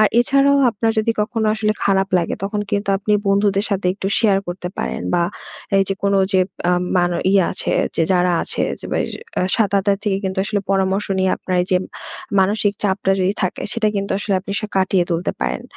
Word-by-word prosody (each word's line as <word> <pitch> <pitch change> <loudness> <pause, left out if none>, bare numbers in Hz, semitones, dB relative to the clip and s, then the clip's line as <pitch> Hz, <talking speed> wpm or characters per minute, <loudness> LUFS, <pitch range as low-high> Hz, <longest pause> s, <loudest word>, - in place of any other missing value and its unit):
আর, 215 - +6
এছাড়াও 275 +2 +3
আপনার 225 +2 0
যদি 225 +1 +2
কখনো 220 0 -1
আসলে 215 -1 0
খারাপ 195 0 +2
লাগে, 170 - -1
তখন 205 +1 -2
কিন্তু 200 0 -1
আপনি 210 +1 -1 0.2
বন্ধুদের 200 0 +2
সাথে 195 -2 -1
একটু 195 -1 -5
শেয়ার 205 -4 +3
করতে 180 0 -5
পারেন। 65 +5 -3
বা 175 - +3 0.6
এইযে, 195 0 +1
কোন 200 0 +2 0.2
যে 190 - +4 0.3
আ - - +3 0.2
মান 175 0 +2 0.2
ইয়ে 195 -2 +5
আছে - - -2 0.2
যে - - +2
যারা 180 0 +2
আছে, - - -3 0.2
যে - - -7
বে - - +1 0.6
সাত 215 -4 +2
আথী 200 0 +1
থেকে 195 -2 0
কিন্তু 190 0 -2
আসলে 205 0 -1
পরামর্শ 195 +1 +1
নিয়ে 190 0 +2
আপনার 185 -1 -3
এইযে 185 0 +1 0.6
মানসিক 205 +1 +2
চাপটা 195 -1 0
যদি 185 +2 +2
থাকে। 185 - -2
সেটা 220 -2 +1
কিন্তু 200 0 -2
আসলে 200 -1 -1
আপনি 200 +1 -6
সা 215 - -3
কাটিয়ে 190 -1 +2
তুলতে 170 +1 -1
পারেন। 65 -1 -2
195 Hz, 195 wpm, -19 LUFS, 185-210 Hz, 0.6 s, আর